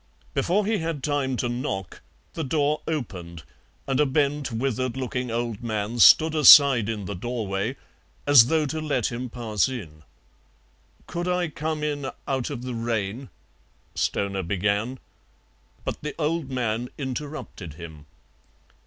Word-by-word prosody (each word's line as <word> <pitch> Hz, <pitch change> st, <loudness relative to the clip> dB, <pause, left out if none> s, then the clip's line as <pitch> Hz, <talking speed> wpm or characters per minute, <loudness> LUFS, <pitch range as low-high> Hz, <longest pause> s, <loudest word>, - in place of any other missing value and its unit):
Before 200 Hz, +4 st, +1 dB
he 215 Hz, 0 st, +1 dB
had 160 Hz, -4 st, -3 dB
time 140 Hz, -3 st, 0 dB
to 120 Hz, -, -1 dB
knock 120 Hz, -, -4 dB, 0.3 s
the 160 Hz, -, -3 dB
door 150 Hz, +1 st, 0 dB
opened 90 Hz, -, -5 dB, 0.4 s
and 135 Hz, 0 st, 0 dB
a 150 Hz, -, +5 dB
bent, 145 Hz, 0 st, 0 dB
withered 130 Hz, +1 st, -2 dB
looking 125 Hz, -1 st, -3 dB
old 115 Hz, -1 st, -3 dB
man 110 Hz, 0 st, -3 dB
stood 160 Hz, +6 st, +7 dB
aside 140 Hz, -6 st, +8 dB
in 105 Hz, -3 st, -3 dB
the 100 Hz, -, -4 dB
doorway 110 Hz, +2 st, -3 dB, 0.5 s
as 140 Hz, -5 st, +8 dB
though 160 Hz, +1 st, +2 dB
to 155 Hz, +2 st, -3 dB
let 140 Hz, -7 st, 0 dB
him 120 Hz, +1 st, -4 dB
pass 115 Hz, -3 st, 0 dB
in. 85 Hz, -13 st, -7 dB, 1.0 s
"Could 175 Hz, +1 st, -4 dB
I 180 Hz, -2 st, 0 dB
come 155 Hz, +1 st, -3 dB
in 145 Hz, -3 st, -2 dB, 0.2 s
out 130 Hz, -3 st, -1 dB
of 120 Hz, -, -6 dB
the 125 Hz, -1 st, -4 dB
rain?" 115 Hz, +1 st, -3 dB, 0.6 s
Stoner 100 Hz, -1 st, -1 dB
began, 100 Hz, +7 st, -1 dB, 0.9 s
but -, -, -4 dB
the 150 Hz, -, -5 dB
old 160 Hz, -2 st, -1 dB
man 120 Hz, -2 st, -2 dB
interrupted 130 Hz, -, -6 dB
him. 80 Hz, -3 st, -11 dB
125 Hz, 140 wpm, -25 LUFS, 110-150 Hz, 1.0 s, aside